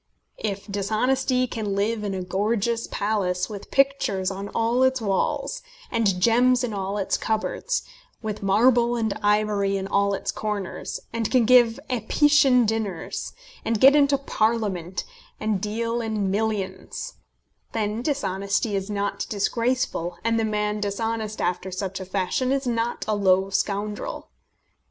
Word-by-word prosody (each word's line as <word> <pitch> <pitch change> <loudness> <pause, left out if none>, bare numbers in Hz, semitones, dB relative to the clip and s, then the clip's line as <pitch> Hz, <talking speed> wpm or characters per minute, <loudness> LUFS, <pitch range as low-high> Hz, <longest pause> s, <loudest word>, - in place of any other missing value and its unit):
If 200 -2 -3
dishonesty 250 +6 +1
can 215 -5 -3
live 210 +2 0
in 200 -2 -2
a 185 - -3
gorgeous 215 +5 0
palace 200 -2 -1
with 200 -2 -8
pictures 270 -9 +1
on 195 +1 -5
all 230 +3 +1
its 260 0 +3
walls, 200 -4 -1 0.3
and 205 -5 +1
gems 245 +4 +4
in 235 -3 -2
all 195 0 -2
its 195 - 0
cupboards, - - -1 0.4
with 215 -2 -5
marble 235 +4 +4
and 220 -3 0
ivory 205 -1 +2
in 190 0 -3
all 200 0 +2
its - - -3
corners, 210 -3 -4
and 230 -2 -1
can 250 -3 +3
give 240 0 +5
Apician 260 +1 +4
dinners, 210 -6 -3 0.3
and 225 -2 0
get 270 +4 +8
into 280 -1 +4
Parliament, 215 -9 -1 0.4
and 215 -3 -1
deal 230 +3 -1
in 215 -4 -1
millions, 205 - -3 0.6
then 215 0 -1
dishonesty 205 -5 -1
is 195 +1 -2
not 205 -1 -2
disgraceful, 215 -4 -1
and 230 0 +2
the - - +1
man 210 -1 -1
dishonest 215 +1 -2
after 180 +1 -1
such 190 0 -4
a 190 - -6
fashion 195 +7 -1
is 275 0 0
not 235 -1 -1
a 215 - +1
low 190 -1 +3
scoundrel. 205 - -2
215 Hz, 140 wpm, -24 LUFS, 195-235 Hz, 0.6 s, get